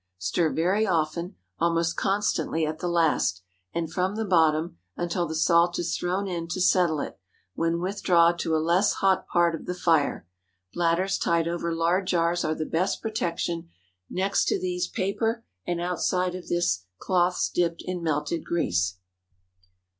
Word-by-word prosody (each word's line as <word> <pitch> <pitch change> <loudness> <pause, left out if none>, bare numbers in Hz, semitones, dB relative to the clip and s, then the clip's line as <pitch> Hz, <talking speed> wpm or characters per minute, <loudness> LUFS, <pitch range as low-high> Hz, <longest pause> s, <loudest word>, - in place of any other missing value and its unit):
Stir 95 - 0
very 190 +7 +1
often—almost 170 0 -1
constantly 195 -5 0
at 155 +1 -4
the 175 - -2
last—and 95 - -1
from 185 +2 0
the 220 0 -2
bottom, 160 - +2 0.2
until 175 0 -1
the 160 - -4
salt 170 +2 +3
is 175 -1 -1
thrown 185 +3 -1
in 170 -3 -3
to 170 +2 -3
settle 180 -4 +3
it, - - -7 0.3
when 165 - 0
withdraw 180 -2 +3
to 165 -2 -1
a - - +3
less 170 +6 +2
hot 190 -1 +1
part 175 -1 +2
of 165 - -6
the 180 - -2
fire. 165 - +1 0.5
Bladders 175 +3 +1
tied 170 -1 +1
over 170 0 -2
lard 170 +3 +1
jars 170 0 +1
are 155 0 0
the 155 - -3
best 180 +6 0
protection; 170 -6 -3 0.4
next 195 +2 +1
to - - +1
these, 180 -1 -2
paper, 225 +3 -1 0.2
and 175 -1 -1
outside 180 +1 0
of 180 0 -8
this, 95 - 0
cloths 180 - +1
dipped 170 -1 -1
in 180 -1 -3
melted 155 0 -1
grease. 90 - 0
170 Hz, 155 wpm, -26 LUFS, 165-180 Hz, 0.5 s, salt